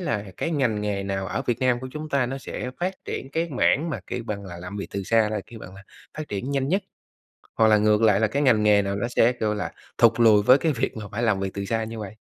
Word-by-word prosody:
là 110 - -2
cái 165 - -2
ngành 125 -9 0
nghề 100 -1 -2
nào 95 -1 -3
ở - - -3
Việt 120 -1 0
Nam 125 -1 +2
của 130 - -6
chúng 155 +2 -6
ta 140 -4 +1
nó 135 +2 -4
sẽ 125 -1 -6
phát 185 +2 -1
triển 135 - -5
cái 165 +3 -1
mảng 150 +4 +2
mà, - - -4
kiểu 125 - -4
bằng 100 -2 -4
là, 90 -1 -8
làm 90 +3 -7
việc 100 - -4
từ 100 - -4
xa 110 +1 +2
là, 105 -2 -2
kêu 115 - -11
bằng 95 -3 -11
là, 100 - -13 0.4
phát 155 - -5
triển 105 +7 -4
nhanh 140 -1 0
nhất, 195 +4 +1 0.8
hoặc 110 -1 +5
là 110 - +6
ngược 105 +1 +3
lại 105 -2 +4
là 110 - +4
cái 125 +7 -1
ngành 115 -6 +4
nghề 105 -1 +5
nào 100 0 -2
nó 120 +4 -2
sẽ, 120 0 +3
kiểu 110 -3 -1
là, 105 - -4 0.3
thụt 115 0 +4
lùi 110 -3 +6
với 125 +6 +6
cái 160 +1 +1
việc 125 -3 -2
mà 110 - -6
phải 115 - -3
làm 110 -5 +2
việc 95 - -2
từ 100 - -3
xa 110 +2 -1
như 115 0 -7
vậy? 105 -2 -7
110 Hz, 290 wpm, -24 LUFS, 105-130 Hz, 0.8 s, là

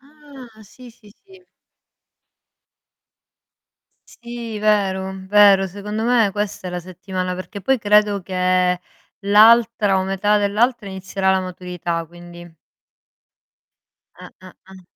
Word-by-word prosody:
Ah, 275 -6 -16
sì, 245 +4 -15
sì, 220 -2 -21
sì. 380 -1 -19 2.7
Sì, 235 -2 -8
vero, 195 -3 0
vero, 200 -1 +5
secondo 205 +3 -6
me 235 -4 +2
questa 205 -2 -4
è - - -6
la 180 0 -5
settimana, 185 +1 -5
perché 185 +3 -8
poi 265 +5 +1
credo 210 -1 +2
che 180 -1 0 0.4
l'altra 215 0 +4
o - - -1
metà 195 +2 0
dell'altra 210 +2 0
inizierà 190 0 -2
la 190 0 +2
maturità, 180 -2 -5
quindi. 175 0 -14 1.7
Eh, - - -10
eh, 185 - -13 0.2
eh. 190 -1 -14
200 Hz, 110 wpm, -20 LUFS, 185-220 Hz, 2.7 s, vero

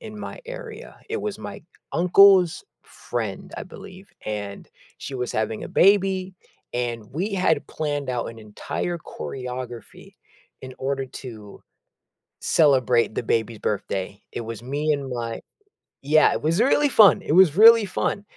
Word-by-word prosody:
in 215 -1 -9
my 205 - -8
area. - - -9
It 445 - -2
was 210 -1 -4
my - - -8 0.3
uncle's 180 0 +5 0.2
friend, - - -6
I - - -6
believe, 190 +1 -13
and 100 -2 -5 0.3
she 135 - -8
was 125 -1 -3
having 110 0 -2
a - - -8
baby 190 -1 +3 0.4
and 120 -2 -3
we 190 +8 -2
had 185 -1 +1
planned 145 -3 -3
out 125 -2 -2
an 115 - -13
entire 110 +10 -5
choreography 125 -5 -8 0.5
in 130 0 -9
order 135 0 -2
to 110 -6 -11 0.8
celebrate 130 -7 +3
the - - -2
baby's 115 -1 -1
birthday. 100 -1 -3
It - - -4
was 115 -1 -7
me 145 +5 -1
and 140 -2 -3
my 115 -2 -4 0.6
Yeah, 150 +3 +4
it - - -3
was 165 +7 +1
really 285 +3 +3
fun, 210 - +6
it - - -2
was 175 -2 +5
really 225 0 +8
fun, 200 +1 -2
145 Hz, 145 wpm, -23 LUFS, 120-190 Hz, 0.8 s, really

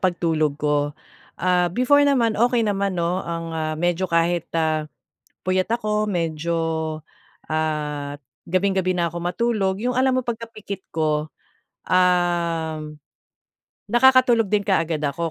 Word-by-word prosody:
pagtulog 165 -5 +1
ko. 145 0 0 0.4
Ah, 180 -1 +2
before 255 - +3
naman 260 -6 +3
okey 235 +1 +2
naman 200 -2 -1
'no 175 +2 0
ang, 165 -2 -5
ah, 155 -1 -2
medyo 175 +3 0
kahit, 170 0 +1
ah, 155 -1 0 0.6
puyat 185 +2 +1
ako 215 -2 0
medyo, 165 -2 -1 0.9
ah, 150 -2 -2 0.3
gabing-gabi 190 0 +1
na 170 - +2
ako 170 +1 -5
matulog 195 0 0
yung 250 +3 -1
alam 255 0 +2
mo 255 - -3
pagkapikit 225 -4 -6
ko, 155 -1 -1 0.6
um, 170 -4 +1 0.9
nakakatulog 240 -3 +4
din 205 -1 +1
kaagad 165 -5 +1
ako. 165 +4 -2
175 Hz, 120 wpm, -22 LUFS, 160-210 Hz, 0.9 s, nakakatulog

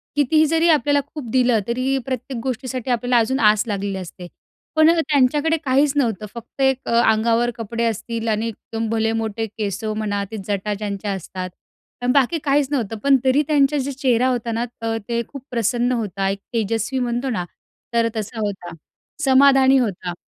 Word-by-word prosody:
कितीही 300 +2 +3
जरी 325 +2 +2
आपल्याला 290 -2 +3 0.2
खूप 270 -7 -6
दिलं 250 -3 +3
तरी 255 +3 0
प्रत्येक 255 -1 -4
गोष्टीसाठी 255 0 -3
आपल्याला 245 +1 +2
अजून 260 +4 +1
आस 210 -1 +4
लागलेली 200 -1 -2
असते. 180 -1 -8 0.5
पण 315 0 +6
त्यांच्याकडे 295 +1 +2
काहीचं 280 +2 +3
नव्हतं 220 -5 -1
फक्त 235 +3 -8
एक 265 -1 +3
अ, - - -1 0.2
अंगावर 230 +2 +2
कपडे 230 +1 -3
असतील 230 +1 -3
आणि 220 +1 0
एकदम 225 0 -5
भले 225 0 +1
मोठे 220 +1 -3
केस 205 -2 -3
म्हणा 215 -2 -2
ते 220 - -5
जटा 205 0 -1
ज्यांच्या 200 0 -4
असतात. 185 0 -5 0.5
आणि 245 0 +1
बाकी 280 +4 +3
काहीचं 285 0 +1
नव्हतं 225 -4 -2
पण 275 -1 +5
तरी 265 +3 +4
त्यांचा 295 -1 +3
जे 280 0 -2
चेहरा 255 -2 +1
होता 240 -2 -1
ना 230 +1 -1 0.2
त - - -4 0.2
ते 235 0 0
खूप 275 -3 -10
प्रसन्न 240 +1 +1
होता. 200 -5 -1
एक 195 - -3
तेजस्वी 225 +3 -1
म्हणतो 245 +2 -1
ना 180 -7 -2 0.5
तर 230 0 +3
तसा 220 +2 -4
होता. 195 -5 -4 0.5
समाधानी 270 0 +5
होता. 195 -7 -1
235 Hz, 170 wpm, -21 LUFS, 215-270 Hz, 0.5 s, पण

